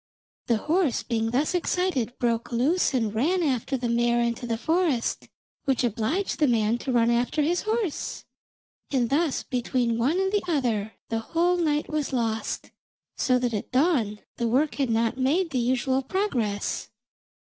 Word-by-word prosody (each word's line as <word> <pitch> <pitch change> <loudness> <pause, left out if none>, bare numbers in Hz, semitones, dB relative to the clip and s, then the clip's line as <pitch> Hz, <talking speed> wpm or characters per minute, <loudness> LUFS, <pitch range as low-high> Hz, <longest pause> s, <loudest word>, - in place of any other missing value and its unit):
The 235 - +3
horse 315 - +1
being 225 -2 -1
thus 275 +9 +1
excited, 355 -9 0
broke 235 -1 -1
loose 280 +10 +2
and 225 -4 0
ran 335 +11 +1
after 270 -2 0
the 245 -1 -2
mare 235 0 +2
into 235 0 -1
the 230 -1 -1
forest, 315 -3 0 0.4
which 265 -2 +1
obliged 240 - -1
the 300 - +4
man 220 -3 +2
also 240 - -3
to 265 - 0
run 235 -1 +4
after 245 +6 +1
his 345 +4 +1
horse, 430 -6 -2 0.6
and 250 -4 0
thus 305 0 +1
between 240 -2 -1
one 290 +10 +2
and 385 0 +1
the 415 -1 +2
other 235 - 0 0.2
the 225 - 0
whole 340 +9 +1
night 300 -3 +1
was 305 -3 -2
lost, 225 -3 -2 0.4
so 255 -1 +2
that 245 -1 -1
at 210 - -4
dawn 255 - +2 0.2
the 235 - 0
work 275 +6 +2
had 275 -3 -1
not 230 +2 +1
made 320 +7 +1
the 260 - 0
usual 260 +2 +1
progress. 250 - -2
255 Hz, 170 wpm, -26 LUFS, 235-315 Hz, 0.6 s, the